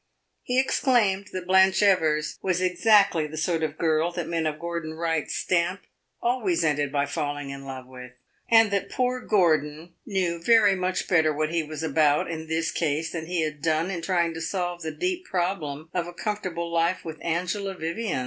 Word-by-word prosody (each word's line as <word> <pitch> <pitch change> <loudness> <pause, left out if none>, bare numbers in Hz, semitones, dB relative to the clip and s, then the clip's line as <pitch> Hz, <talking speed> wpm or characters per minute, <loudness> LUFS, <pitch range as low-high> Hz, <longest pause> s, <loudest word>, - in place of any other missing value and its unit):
He 250 +1 0
exclaimed 225 -7 +2
that 185 -1 -5
Blanche 190 +1 +4
Evers 155 -6 +2
was 185 -2 0
exactly 185 -2 +3
the 155 +1 -8
sort 165 +1 0
of 155 -1 -2
girl 160 +1 +1
that 175 -2 -4
men 165 -1 -1
of 155 -1 -3
Gordon 170 -1 -5
Wright's 165 -2 -1
stamp 180 +1 0 0.4
always 225 -9 +1
ended 145 -2 +1
by 140 0 +1
falling 145 0 -3
in 135 0 -8
love 130 -1 -7
with, 125 -1 -11 0.4
and 225 -2 +6
that 200 0 -1
poor 255 0 0
Gordon 165 -7 +1
knew 180 -4 -1
very 215 0 +5
much 185 0 -2
better 160 -4 +3
what 155 +1 -1
he 170 - +2
was 155 0 -6
about 150 0 +2
in 160 -1 -6
this 160 +1 -1
case 155 0 -1
than 160 -2 -5
he 175 -1 -1
had 155 -2 -4
done 160 +3 +1
in 175 -3 -4
trying 170 -1 0
to 165 - -6
solve 175 0 -3
the 160 - -3
deep 360 - -3
problem 165 -5 -3
of 175 -2 -1
a 175 - -8
comfortable 175 -5 -4
life 170 +2 +1
with 160 -1 -7
Angela 180 +4 -2
Vivian. 170 - -3
170 Hz, 185 wpm, -25 LUFS, 155-190 Hz, 0.4 s, and